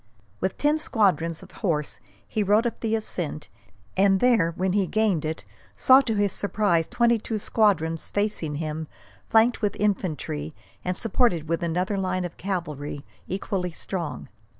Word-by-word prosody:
With 190 0 -2
ten 295 +1 +2
squadrons 180 - +1
of - - -14
horse 155 -8 -2 0.3
he 215 - -1
rode 210 +3 +3
up 235 - -2
the 225 -1 0
ascent, 175 -8 -1 0.5
and 195 0 +4
there, 230 -9 +4
when 185 0 0
he 195 -2 +2
gained 205 -8 +1
it, 160 +1 -4 0.3
saw 260 +1 +7
to 225 -5 -2
his 205 -1 +1
surprise 200 -5 +1
twenty 235 -1 +2
two 220 +1 -3
squadrons 175 -7 +1
facing 205 -7 -1
him, 155 +1 -4 0.4
flanked 225 +2 +4
with 205 -2 0
infantry, 160 -7 -2 0.3
and 180 0 -2
supported 220 - +1
with 165 +1 -1
another 180 +4 -1
line 185 -1 -1
of 175 - -7
cavalry 150 -7 -4 0.2
equally 190 -1 -2
strong. 170 -1 -5
190 Hz, 150 wpm, -25 LUFS, 165-215 Hz, 0.5 s, saw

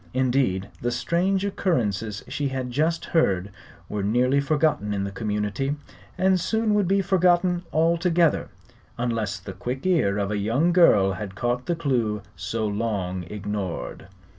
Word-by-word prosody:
Indeed, 125 -7 +1
the 120 - 0
strange 180 +10 0
occurrences 110 - -1
she 145 - -2
had 130 -2 -3
just 160 +6 0
heard 100 - +1 0.4
were 105 - -3
nearly 125 +7 +2
forgotten 145 -7 +1
in 100 - -1
the 100 - -3
community, 105 +7 -2 0.4
and 190 0 +3
soon 220 +4 +1
would 205 -3 +2
be 195 +2 +3
forgotten 180 -1 +3
altogether 170 0 +2 0.5
unless 115 -4 -1
the 95 +1 -8
quick 125 - -5
ear 155 - +2
of 100 0 -1
a 105 - -1
young 135 +12 +2
girl 105 - +5
had 100 -1 -6
caught 120 +3 -1
the 175 - +1
clue 120 - -1
so 105 +5 -3
long 100 -4 -2
ignored. 100 -1 -5
125 Hz, 145 wpm, -25 LUFS, 105-170 Hz, 0.5 s, girl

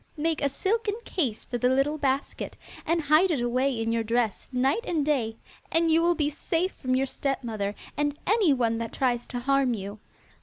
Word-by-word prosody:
Make 320 +1 0
a 280 - +2
silken 410 +9 0
case 260 - -1
for 245 - -3
the 250 - +3
little 275 +4 +1
basket, 275 0 -2 0.3
and 335 +1 +2
hide 310 +6 +5
it 310 -6 +1
away 250 +1 +1
in 225 0 0
your 230 0 +1
dress 230 -1 0
night 265 - +1
and 320 - 0
day 235 -7 0 0.3
and 330 0 +3
you 325 +1 +5
will 345 +1 +3
be 300 -3 +1
safe 330 +5 -1
from 255 -1 -1
your 265 +1 +2
stepmother 230 -7 -2 0.2
and 290 0 0
anyone 280 - +3
that 230 -1 -4
tries 245 -3 0
to 245 - -4
harm 270 -1 +2
you. 200 +1 -7
275 Hz, 190 wpm, -27 LUFS, 240-315 Hz, 0.3 s, hide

